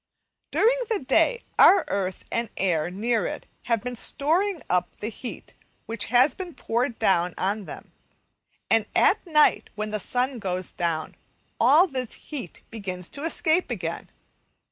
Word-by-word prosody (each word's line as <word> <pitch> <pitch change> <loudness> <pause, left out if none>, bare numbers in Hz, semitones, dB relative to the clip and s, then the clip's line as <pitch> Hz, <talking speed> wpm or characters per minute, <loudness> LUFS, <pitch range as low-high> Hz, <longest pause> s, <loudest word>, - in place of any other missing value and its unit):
During 480 +3 +3
the 445 - +1
day 470 - +2 0.2
our 385 -3 +7
earth 190 -2 -3
and 230 -2 -1
the - - -10
air 170 -3 +1
near 220 +5 0
it - - -6 0.2
have 230 -2 0
been 250 0 -4
storing 335 - 0
up 180 0 0
the 210 - -5
heat 235 +1 -8 0.3
which 225 -2 -1
has 250 +4 +4
been 360 -1 -8
poured 235 +1 -1
down 180 -5 +2
on 200 +2 -1
them, - - -10 0.8
and 225 -2 +2
at - - +4
night, 300 -2 +3
when 215 0 -4
the 215 - -2
sun 250 +5 -1
goes 185 -2 -3
down, 165 -2 -2 0.5
all 285 +10 +6
this 260 - -3
heat 260 - -8
begins 185 -5 -4
to 280 - -4
escape 325 +1 +1
again. 170 -8 -4
230 Hz, 155 wpm, -25 LUFS, 190-285 Hz, 0.8 s, our